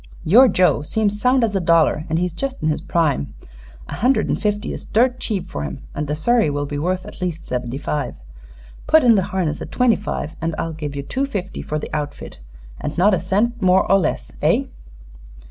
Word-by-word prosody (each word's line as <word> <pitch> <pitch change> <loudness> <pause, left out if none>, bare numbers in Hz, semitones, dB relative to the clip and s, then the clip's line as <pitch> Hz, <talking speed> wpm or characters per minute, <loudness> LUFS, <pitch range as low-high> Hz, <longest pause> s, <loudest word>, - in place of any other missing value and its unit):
Your 240 +11 +7
Joe 180 - +3
seems 210 +5 -1
sound 255 0 +3
as 220 -2 +1
a - - +2
dollar, 165 -3 +3
and 160 - +1
he's 180 0 -1
just 270 +5 -4
in 155 - +2
his 150 - -1
prime. 150 - 0 0.5
A - - -7
hundred 255 +5 +2
and - - -1
fifty 210 -1 -1
is - - -7
dirt 250 +3 +1
cheap 205 -5 -2
for 70 - -5
him, 70 -2 -6
and 150 +1 -3
the 150 - -1
surrey 225 +4 +2
will 145 0 -2
be 145 0 -4
worth 180 +4 -1
at - - -11
least 170 -2 -3
seventy 125 0 -3
five. 145 - -3 0.7
Put 315 0 +5
in 240 -2 +6
the 200 - +3
harness 170 -5 -2
at - - -7
twenty 250 -3 +3
five, 190 -6 -4
and 165 -1 -2
I'll 165 - -3
give 150 -2 -5
you 140 - -4
two 265 - -2
fifty 195 -7 -5
for 155 - -3
the 150 - -6
outfit, 145 - -5 0.4
and 150 - -5
not 195 +4 +4
a 185 - +2
cent 210 +7 0
more 185 0 +4
or 195 - +6
less. 175 - -2
Eh?" - - +3
180 Hz, 215 wpm, -20 LUFS, 150-215 Hz, 0.7 s, Your